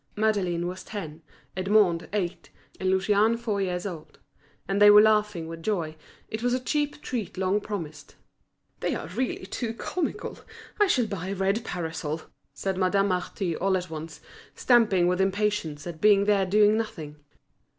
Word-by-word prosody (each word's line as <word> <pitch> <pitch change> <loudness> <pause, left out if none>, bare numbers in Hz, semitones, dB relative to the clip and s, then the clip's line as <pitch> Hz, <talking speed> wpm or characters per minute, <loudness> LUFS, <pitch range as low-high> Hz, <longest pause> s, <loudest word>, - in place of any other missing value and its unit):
Madeleine 200 -5 0
was 180 +1 -5
ten, 165 -7 -7 0.3
Edmond 185 -2 +2
eight, 190 -4 -3 0.3
and 185 - 0
Lucien 205 +4 +3
four 220 -4 -2
years 180 -1 -2
old; 170 -6 -7 0.5
and 195 +1 0
they 205 - +9
were 205 0 +9
laughing 210 -5 +3
with 165 0 -8
joy, 165 -5 -2 0.3
it 220 - -5
was 245 +1 +1
a - - -1
cheap 295 +3 -2
treat 225 -8 -4
long 190 +2 +1
promised. 160 -9 -7 0.6
"They - - -1
are - - -5
really 250 -6 -3
too 225 +3 -4
comical; 335 +7 -4 0.4
I 415 - +5
shall 255 -10 +2
buy 195 -4 -5
a 195 - -3
red 195 +4 0
parasol," 160 -4 -4 0.3
said 190 -1 -3
Madame 195 +2 +2
Marty 180 -1 -2
all 190 +2 +1
at 180 -2 -6
once, 160 +1 -7 0.3
stamping 225 -8 +4
with 180 +1 +2
impatience 195 -6 -1
at 165 -2 -7
being 205 -1 +5
there 200 -2 +2
doing 210 +2 +4
nothing. 160 -10 -5
195 Hz, 160 wpm, -26 LUFS, 175-215 Hz, 0.6 s, they